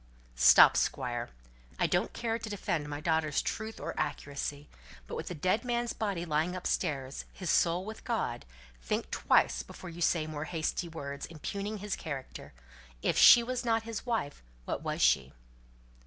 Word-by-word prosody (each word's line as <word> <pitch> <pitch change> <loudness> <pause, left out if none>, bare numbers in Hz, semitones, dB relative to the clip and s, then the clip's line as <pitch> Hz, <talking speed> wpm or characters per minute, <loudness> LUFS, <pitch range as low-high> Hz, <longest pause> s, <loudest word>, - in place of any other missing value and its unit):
"Stop, 60 +2 +8
Squire. - - -1 0.5
I - - +2
don't - - +1
care 230 -1 -2
to 220 - -6
defend 170 -7 -2
my 145 0 -5
daughter's 160 -2 +1
truth 220 +1 -4
or - - -4
accuracy. 145 +1 -3 0.4
But - - -6
with - - -5
the 180 - -4
dead 185 - +1
man's 240 -1 -1
body 195 -6 -2
lying 160 +3 0
upstairs 140 -6 -2
his 185 -3 -3
soul 175 +2 +2
with 220 +1 -8
God 220 - -2 0.4
think - - -2
twice 65 0 +3
before 170 - -10
you 170 +1 -9
say 165 -2 +2
more 155 -1 -5
hasty 165 +2 -2
words, 140 -3 -6
impugning 200 +6 -5
his 205 0 -3
character; 135 - -7 0.5
if - - +2
she 240 - +9
was 250 +1 -3
not 225 -1 +1
his 225 -2 -5
wife, 225 - -2 0.2
what - - -3
was - - -1
she?" 65 0 +3
170 Hz, 165 wpm, -31 LUFS, 145-215 Hz, 0.5 s, she